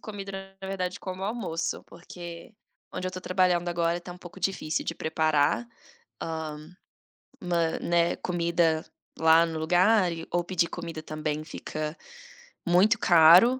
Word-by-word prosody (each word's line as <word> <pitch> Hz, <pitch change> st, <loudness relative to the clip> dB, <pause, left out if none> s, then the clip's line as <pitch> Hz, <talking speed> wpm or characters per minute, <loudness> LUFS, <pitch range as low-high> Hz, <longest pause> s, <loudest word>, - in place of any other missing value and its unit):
comido 200 Hz, -2 st, -7 dB
na 195 Hz, 0 st, -8 dB
verdade 185 Hz, 0 st, -3 dB
como 190 Hz, 0 st, -5 dB
almoço, 200 Hz, -7 st, -2 dB
porque 170 Hz, +2 st, -10 dB, 0.4 s
onde 185 Hz, -, -3 dB
eu -, -, -5 dB
tô 185 Hz, -, -7 dB
trabalhando 180 Hz, -1 st, +2 dB
agora 170 Hz, 0 st, 0 dB
tá 175 Hz, 0 st, -8 dB
um 180 Hz, -, -13 dB
pouco 175 Hz, +1 st, -11 dB
difícil 180 Hz, -4 st, -1 dB
de -, -, -3 dB
preparar, 155 Hz, +6 st, +1 dB, 0.6 s
hã, 155 Hz, -1 st, -5 dB, 0.7 s
mã 170 Hz, -2 st, 0 dB
né, 170 Hz, 0 st, +2 dB
comida 170 Hz, -2 st, +1 dB, 0.3 s
lá 160 Hz, +1 st, +6 dB
no 165 Hz, -1 st, -3 dB
lugar 180 Hz, +3 st, +4 dB
e 165 Hz, 0 st, -6 dB
ou 175 Hz, 0 st, +1 dB
pedir 175 Hz, -1 st, 0 dB
comida 165 Hz, -2 st, -6 dB
também 155 Hz, 0 st, -3 dB
fica 155 Hz, 0 st, -5 dB, 0.7 s
muito 200 Hz, +6 st, +4 dB
caro. 175 Hz, +10 st, +7 dB
175 Hz, 140 wpm, -27 LUFS, 160-185 Hz, 0.7 s, caro